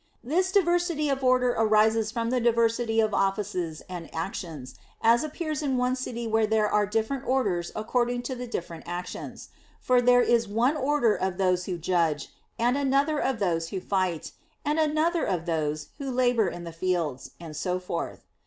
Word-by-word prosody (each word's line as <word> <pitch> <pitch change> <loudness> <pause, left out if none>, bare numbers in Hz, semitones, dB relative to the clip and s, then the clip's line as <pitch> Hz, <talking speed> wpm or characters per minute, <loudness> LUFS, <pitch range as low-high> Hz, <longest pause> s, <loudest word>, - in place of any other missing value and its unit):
This 360 +9 +1
diversity 345 -5 +2
of 270 -1 -1
order 255 -1 +4
arises 220 0 +3
from 230 +1 -2
the 255 -1 +1
diversity 230 -1 +2
of 220 -1 +2
offices 195 -5 -1
and 175 -3 -7
actions, 165 - -5 0.3
as 230 +3 +4
appears 310 0 -3
in 270 -3 0
one 250 +1 +1
city 240 -2 -4
where 220 -1 +2
there 215 -1 +2
are 210 -1 +2
different 225 +5 -1
orders 200 -10 0
according 245 +2 0
to 260 - -3
the 250 -1 -6
different 170 -7 -6
actions; 175 +1 -6 0.3
for 250 -1 +3
there 245 0 +5
is 235 -2 +2
one 235 +8 +2
order 280 -5 +2
of 185 -1 -2
those 180 -2 +1
who 180 -2 -3
judge, 165 -4 0 0.3
and 245 +4 +2
another 280 +2 +2
of 265 -4 0
those 165 -5 0
who 195 - -3
fight, 185 -3 -1 0.3
and 300 +2 +1
another 315 +2 +2
of 175 -4 -1
those 155 -2 -2
who 275 -1 -4
labor 245 -3 +2
in 175 - -5
the 170 -1 -7
fields, 165 -6 -2
and 165 -3 -9
so 180 +3 -1
forth. 180 0 -5
225 Hz, 175 wpm, -27 LUFS, 180-255 Hz, 0.3 s, there